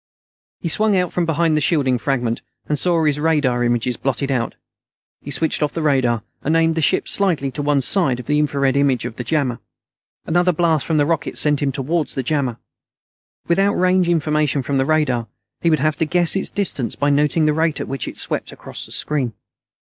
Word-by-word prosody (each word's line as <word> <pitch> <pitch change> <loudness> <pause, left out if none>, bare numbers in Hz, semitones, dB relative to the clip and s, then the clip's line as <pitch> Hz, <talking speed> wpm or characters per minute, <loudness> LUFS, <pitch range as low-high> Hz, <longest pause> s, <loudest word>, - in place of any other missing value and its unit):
He - - -3
swung 210 +4 +2
out 180 -1 -1
from 175 -2 0
behind 165 0 +1
the 155 - +1
shielding 135 -6 +1
fragment, 120 -4 -1 0.3
and 150 -2 -1
saw 170 -1 +1
his 150 -1 +1
radar 145 -6 +1
images 120 0 0
blotted 135 +1 -2
out. 120 -3 -1 0.7
He - - -9
switched 160 +4 0
off 150 - 0
the 165 - -3
radar, 125 -6 +1 0.2
and 160 +3 +1
aimed 165 0 +3
the 160 - -1
ship - - +1
slightly 170 -9 +1
to 145 - -5
one 145 -1 +1
side 135 -4 +2
of 125 - -8
the 150 +1 +1
infrared 140 -3 +1
image 135 -4 +1
of 120 -2 -6
the 120 - -4
jammer. 125 -2 -1 0.7
Another 175 +2 +2
blast 160 -3 +1
from 160 - +1
the 145 - +3
rockets 165 +1 -1
sent 150 -1 +3
him 140 -1 +1
towards 150 +5 -2
the 135 - -2
jammer. 130 -4 -1 0.9
Without 195 +4 +2
range 185 -1 +2
information 150 -4 +1
from 135 +2 -1
the 135 - +2
radar, 130 -7 +1 0.3
he 170 - +2
would 155 - +3
have 155 +1 0
to 160 - +1
guess 175 +2 +2
its 195 - 0
distance 170 -11 -1
by 145 0 +1
noting 150 +2 +2
the 150 - +3
rate 160 0 0
at - - -4
which 135 -1 -4
it - - -7
swept - - -3
across - - -7
the - - -16
screen. 135 -6 -1
150 Hz, 210 wpm, -20 LUFS, 135-165 Hz, 0.9 s, aimed